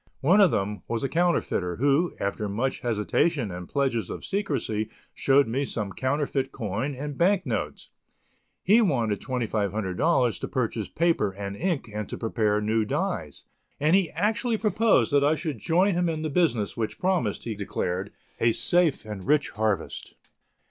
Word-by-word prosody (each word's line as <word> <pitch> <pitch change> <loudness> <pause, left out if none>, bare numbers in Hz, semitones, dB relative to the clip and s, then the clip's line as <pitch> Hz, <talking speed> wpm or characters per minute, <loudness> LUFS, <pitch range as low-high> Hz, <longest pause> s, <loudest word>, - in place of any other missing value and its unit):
One 180 +9 +5
of 195 - +7
them 105 -2 -2
was 115 +1 -2
a - - +1
counterfeiter, 160 - 0
who, 140 +7 +2
after 100 +1 -2
much 120 +7 -1
hesitation 120 - 0
and 90 0 -7
pledges 135 -5 0
of - - -6
secrecy 130 - -2 0.2
showed 140 -1 +3
me 130 +5 -1
some 105 -7 -4
counterfeit 135 0 -1
coin 115 +5 -3
and 145 +2 -5
bank 185 +3 +2
notes; 75 - -4 0.7
he 215 +5 +5
wanted 120 - +1
$2,500 115 - 0
to - - -4
purchase 115 -5 -2
paper 165 -11 +1
and 100 0 -5
ink 170 - -1
and 105 0 -4
to - - -5
prepare 110 -2 0
new 110 +1 +1
dies, 105 - -3 0.4
and 155 +5 +4
he 190 -4 +3
actually 225 +2 +1
proposed 215 -6 +2
that 140 -1 +5
I 150 +2 +3
should 155 -6 -4
join 180 - +2
him 175 0 +1
in 160 -1 -3
the 155 - -2
business 130 - +1
which 110 -2 -3
promised, 180 - 0
he 115 - -3
declared, 100 -1 -3 0.3
a 115 0 +3
safe 175 -5 +2
and 105 -2 -7
rich 150 0 +3
harvest. 110 -2 -2
130 Hz, 160 wpm, -26 LUFS, 105-165 Hz, 0.7 s, of